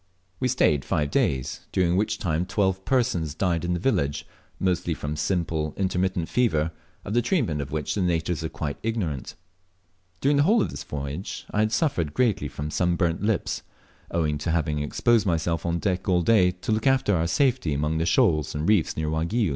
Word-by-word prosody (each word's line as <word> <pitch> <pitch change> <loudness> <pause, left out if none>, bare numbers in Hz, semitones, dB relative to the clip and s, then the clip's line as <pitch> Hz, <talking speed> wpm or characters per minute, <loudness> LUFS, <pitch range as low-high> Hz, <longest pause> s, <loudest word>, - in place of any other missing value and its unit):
We 130 - +1
Staved 75 - +2
five 75 -1 -1
days, 65 -2 -1
during 90 -1 +2
which 105 +3 +1
time 85 -1 -1
twelve 95 -2 0
persons 90 - 0
died 85 -3 0
in 90 0 0
the - - -2
village, 85 - 0 0.3
mostly 90 -3 0
from 75 +1 -4
simple 80 -1 -1
intermittent 95 -2 0
fever, 80 -11 +1 0.3
of 100 - -4
the 120 - +3
treatment 115 - 0
of 70 - -6
which 75 -2 -2
the 100 - -1
natives 85 -2 0
are 80 - -2
quite 75 -2 -4
ignorant. 100 - -3 0.8
During 140 +1 +2
the - - +5
whole 210 +10 +4
of - - -3
this - - -6
voyage 75 +5 -5
I 105 - -1
had 110 0 +2
suffered 90 - 0
greatly 105 -10 +1
from 75 +2 -5
sunburnt 85 -1 +1
lips, 105 -2 0 0.5
owing 75 -3 0
to 80 - -3
having 75 -2 0
exposed 110 +9 +2
myself 85 0 0
on 85 0 0
deck 95 +1 -1
all 90 -1 +3
day 95 -3 +5
to 90 +4 -4
loon 110 +4 +1
after 130 -7 +3
our 85 0 +1
safety 130 - +1
among 75 +2 0
the 80 - 0
shoals 75 -3 +2
and 75 +2 -2
reefs 105 -7 +2
near 80 0 -1
Waigiou. 85 +7 0
85 Hz, 190 wpm, -25 LUFS, 80-105 Hz, 0.8 s, the